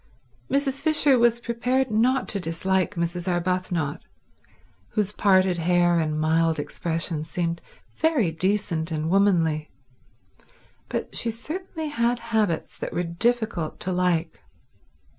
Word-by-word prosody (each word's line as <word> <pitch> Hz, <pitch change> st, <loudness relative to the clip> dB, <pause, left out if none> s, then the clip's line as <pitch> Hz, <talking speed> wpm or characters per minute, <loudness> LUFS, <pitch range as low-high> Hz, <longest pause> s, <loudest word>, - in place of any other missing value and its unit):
Mrs. 275 Hz, 0 st, 0 dB
Fisher 295 Hz, -4 st, +4 dB
was 235 Hz, 0 st, +4 dB
prepared 245 Hz, +2 st, 0 dB
not 245 Hz, +5 st, +2 dB
to 200 Hz, -, 0 dB
dislike 190 Hz, +3 st, -1 dB
Mrs. 170 Hz, +1 st, -2 dB
Arbuthnot, 175 Hz, -4 st, -1 dB, 0.9 s
whose 210 Hz, -2 st, 0 dB
parted 190 Hz, -4 st, +3 dB
hair 175 Hz, 0 st, +3 dB
and 155 Hz, -1 st, -1 dB
mild 160 Hz, +1 st, +2 dB
expression 160 Hz, +1 st, -2 dB
seemed 170 Hz, +1 st, -3 dB, 0.4 s
very 295 Hz, -, +2 dB
decent 175 Hz, -1 st, -1 dB
and 155 Hz, +1 st, -2 dB
womanly, 165 Hz, -6 st, +2 dB, 1.2 s
but -, -, -4 dB
she 235 Hz, -, +2 dB
certainly 315 Hz, +7 st, -5 dB
had 235 Hz, -2 st, +1 dB, 0.2 s
habits 205 Hz, -7 st, 0 dB
that -, -, -5 dB
were 175 Hz, -, 0 dB
difficult 190 Hz, -1 st, -1 dB
to 185 Hz, -, -1 dB
like. 180 Hz, -3 st, 0 dB
185 Hz, 120 wpm, -25 LUFS, 165-235 Hz, 1.2 s, Fisher